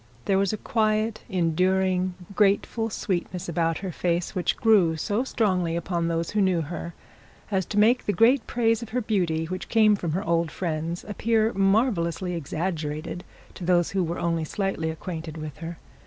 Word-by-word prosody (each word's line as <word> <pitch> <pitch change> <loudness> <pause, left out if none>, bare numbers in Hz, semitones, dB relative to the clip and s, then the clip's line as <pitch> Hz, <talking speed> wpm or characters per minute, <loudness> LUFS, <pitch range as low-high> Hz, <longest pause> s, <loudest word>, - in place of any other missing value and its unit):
There 195 -1 +3
was 195 -1 +2
a 215 - -2
quiet, 215 0 0
enduring, 185 +1 +1 0.2
grateful 210 +2 +2
sweetness 185 -3 -3
about 165 -1 0
her 185 - -3
face, 170 +1 -1
which 180 - 0
grew 190 -8 +4
so 210 +8 0
strongly 185 -10 0
upon 170 0 -1
those 165 0 -1
who 210 - +1
knew 185 -3 +2
her, 170 +2 -6 0.6
as 190 -3 0
to 210 - -4
make 230 +4 +4
the - - +3
great 230 +5 +4
praise 230 -1 +1
of 235 - -7
her 250 +2 -1
beauty 175 -8 0
which 185 +2 -5
came 215 -2 +5
from 170 -5 -3
her 190 +4 -1
old 170 -3 +1
friends, 165 +1 -3
appear 220 +1 +1
marvellously 195 -4 +1
exaggerated 160 0 -3 0.3
to 185 - -9
those 175 -1 +2
who 195 -2 +1
were 170 +1 -3
only 165 -1 0
slightly 195 -1 -2
acquainted 160 -1 -6
with 155 -2 -7
her. 165 +1 -6
180 Hz, 170 wpm, -25 LUFS, 165-210 Hz, 0.6 s, came